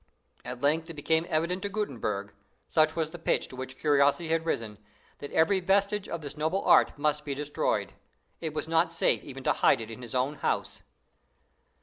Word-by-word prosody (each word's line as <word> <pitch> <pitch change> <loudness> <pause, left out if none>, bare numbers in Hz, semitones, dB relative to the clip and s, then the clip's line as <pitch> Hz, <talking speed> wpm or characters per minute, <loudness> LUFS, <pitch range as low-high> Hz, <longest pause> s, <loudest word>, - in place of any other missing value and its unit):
At 125 0 -6
length 160 +3 +2
it 165 - -7
became 160 +3 +1
evident 170 +4 0
to 200 - -2
Gutenberg 115 - -3 0.3
such 155 -1 +3
was 160 -2 -1
the 175 - -8
pitch 165 - 0
to - - -10
which 130 0 -7
curiosity 145 +2 +3
had 165 0 0
risen 110 -8 -2 0.4
that 145 - -7
every 190 +5 +3
vestige 200 +2 +1
of 170 - -4
the 145 -1 -6
noble 160 +6 -1
art - - +5
must 150 0 0
be 140 -2 -3
destroyed. 145 +1 -1 0.5
It 160 -2 -4
was 155 - -2
not 165 +1 +2
safe 165 - +1
even 135 -1 -9
to - - +3
hide - - +4
it 115 0 -7
in 115 - -9
his 120 0 -7
own 135 +4 0
house. - - -2
155 Hz, 195 wpm, -28 LUFS, 140-165 Hz, 0.5 s, art